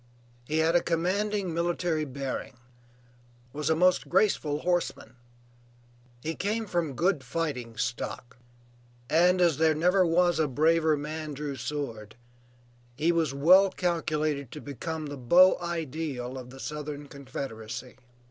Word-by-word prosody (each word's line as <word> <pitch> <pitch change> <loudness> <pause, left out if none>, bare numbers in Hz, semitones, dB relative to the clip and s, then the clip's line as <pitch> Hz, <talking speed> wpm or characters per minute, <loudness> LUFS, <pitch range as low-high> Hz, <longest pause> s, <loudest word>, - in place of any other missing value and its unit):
He 155 - -1
had 160 +2 +3
a 175 - +5
commanding 190 +2 -1
military 170 -1 0
bearing, 135 -1 -5 1.0
was 150 +1 -2
a 160 - +4
most 180 +2 +3
graceful 175 -6 +2
horseman; 175 -7 -1 1.1
he 160 - -2
came 215 +6 -2
from 170 -8 -2
good 170 -1 +1
"fighting 125 -6 -3
stock," 120 0 -4 0.7
and 180 +3 +4
as 170 -5 +3
there 160 0 +3
never 180 +4 +3
was 175 0 +2
a 155 - +3
braver 155 +3 +3
man 155 0 -5
drew 145 0 -4
sword, 115 -8 -5 0.8
he 160 +6 +2
was 165 -4 +1
well 185 +7 +6
calculated 155 -6 -1
to 150 - -7
become 155 +3 -5
the 145 -1 -6
beau 175 +9 +6
ideal 155 -6 -4
of 125 -1 -8
the 135 +1 -12
Southern 150 0 -6
Confederacy. 130 -3 -7
155 Hz, 130 wpm, -28 LUFS, 140-175 Hz, 1.1 s, well